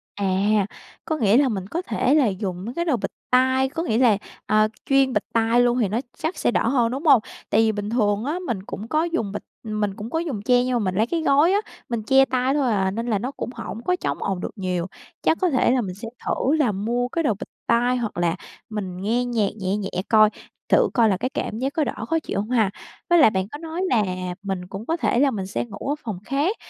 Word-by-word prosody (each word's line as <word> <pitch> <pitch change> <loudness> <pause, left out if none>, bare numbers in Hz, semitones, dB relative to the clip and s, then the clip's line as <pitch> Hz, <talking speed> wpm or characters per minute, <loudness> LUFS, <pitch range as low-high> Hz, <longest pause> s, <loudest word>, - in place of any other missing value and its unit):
À, 200 - -2 0.8
có 315 - -1
nghĩa 220 -3 +4
là 275 -2 +4
mình 195 -4 -3
có 335 - -3
thể 280 -7 0
là 285 -6 +4
dùng 190 -2 -3
mấy 235 - -5
cái 340 - -1
đồ 295 -7 +2
bịt - - -4 0.2
tai, 260 +1 +3
có 325 +4 -3
nghĩa 225 -10 0
là, 235 -5 +5 0.3
à, 215 0 +3 0.2
chuyên 270 -1 +3
bịt - - +1
tai 230 +1 +3
luôn 245 0 +2
thì 220 - +2
nó 220 +5 -1 0.2
chắc 320 +4 -3
sẽ - - +1
đỡ - - +1
hơn, 235 -2 +2
đúng 275 +6 -4
hông? 275 -7 +7 0.3
Tại - - +4
vì 220 -1 +3
bình 205 -1 -4
thường 210 -2 +1
á 310 +6 -1
mình 195 -6 -2
cũng 210 +2 -7
có 310 +4 +1
dùng 335 -12 -1
bịt 210 - -5 0.2
mình 210 -3 -2
cũng 220 +1 -7
có 325 - -1
dùng 295 -12 -3
che 245 +3 +3
nhưng 255 0 -1
mà - - +2
mình 185 -4 -1
lấy 220 +4 +2
cái 330 +5 -1
gối 300 +3 +4
á, 405 - +4 0.3
mình 235 -3 -2
che 270 +4 +5
tay 255 0 0
thôi 275 -4 +1
à, 190 -3 +1
nên 230 +4 -3
là 215 -4 +1
nó 250 +6 -3
cũng 280 - -5
hổng 225 - -6
có 360 - +2
chống 360 - -3
ồn 195 -2 -1
được - - -4
nhiều. 180 -4 -2 0.4
Chắc 325 - +2
có 365 - +3
thể 255 -3 +3
là 255 0 +2
mình 185 -5 -5
sẽ 220 +4 -8 0.2
thử 280 +4 +1
là 290 -8 +2
mua 235 +5 -1
cái 330 +6 -2
đồ 240 - +2
bịt 200 - -8 0.2
tai, 245 +2 +3
hoặc 230 -6 -3
là 175 -1 +1 0.3
mình 195 -5 -4
nghe 235 +5 +1
nhạc 225 -5 +1
nhẹ 190 +1 -1
nhẹ 200 -2 -3 0.2
coi, 215 -2 +6 0.4
thử - - +4
coi 230 -3 +4
là 190 - +1
cái 255 - -2
cảm 220 - -4
giác 270 +3 -1
có 315 - +1
đỡ - - -4
khó 325 0 +1
chịu 205 - -3
hông 210 +3 -3
ha? 225 -5 +3 0.4
Với 345 -1 +6
lại 290 - +8
bạn 190 -2 -1
có 290 - -6
nói 325 +2 -5
là 225 -4 +3 0.4
mình 190 -2 -4
cũng 195 +4 -7
có 330 +5 0
thể 250 -7 +1
là 280 0 +4
mình 195 -5 -4
sẽ 195 - -2
ngủ 215 +3 -7
ở - - 0
phòng 215 -6 -4
khác, 290 - 0
235 Hz, 265 wpm, -23 LUFS, 205-270 Hz, 0.8 s, lại